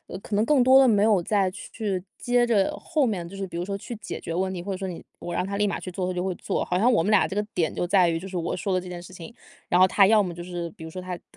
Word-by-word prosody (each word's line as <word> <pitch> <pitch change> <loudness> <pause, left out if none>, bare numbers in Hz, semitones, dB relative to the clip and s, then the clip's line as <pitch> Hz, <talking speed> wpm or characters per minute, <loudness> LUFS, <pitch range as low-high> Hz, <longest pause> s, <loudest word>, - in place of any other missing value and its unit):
呃 185 - -6
可 205 - -6
能 210 - +3
更 280 +2 +3
多 260 +2 +7
的 260 - +6
没 205 -2 +4
有 205 -5 +3
再 195 0 +1
去 200 -3 -4 0.2
接 245 0 +2
着 220 -5 +2
后 295 -5 0
面 180 -6 -3
就 195 - -10
是 195 -1 -4
比 170 - -8
如 175 - -2
说 200 +1 -4
去 240 - -7
解 - - -6
决 165 - -5
问 190 +1 -1
题， 180 - -5
或 195 +2 -4
者 - - -3
说 190 0 -4
你 175 - -7 0.2
我 175 - -5
让 180 +2 -1
他 200 0 -3
立 205 0 +2
马 - - -2
去 - - -8
做 185 0 -3
他 - - -1
就 180 +1 -2
会 185 -2 -1
做。 - - -2
好 180 - -1
像 245 +3 +4
我 225 - +3
们 210 - +1
俩 205 - +4
这 190 - -6
个 210 - +2
点 165 -3 0
就 175 - -2
在 180 -2 +4
于 165 0 0
就 190 - -8
是 190 -1 -6
我 170 -1 -2
说 195 -3 -2
的 185 - +1
这 180 - -10
件 175 -1 -6
事 180 +2 -12
情， 180 +4 -10 0.4
然 180 - +3
后 185 - +8
他 195 +1 +4
要 220 -1 +5
么 180 -4 -2
就 175 - -7
是 175 -1 -5
比 160 - -15
如 160 - -7
说 185 - -6
他 180 -1 -5
态 - - -19
190 Hz, 375 characters per minute, -25 LUFS, 180-210 Hz, 0.4 s, 后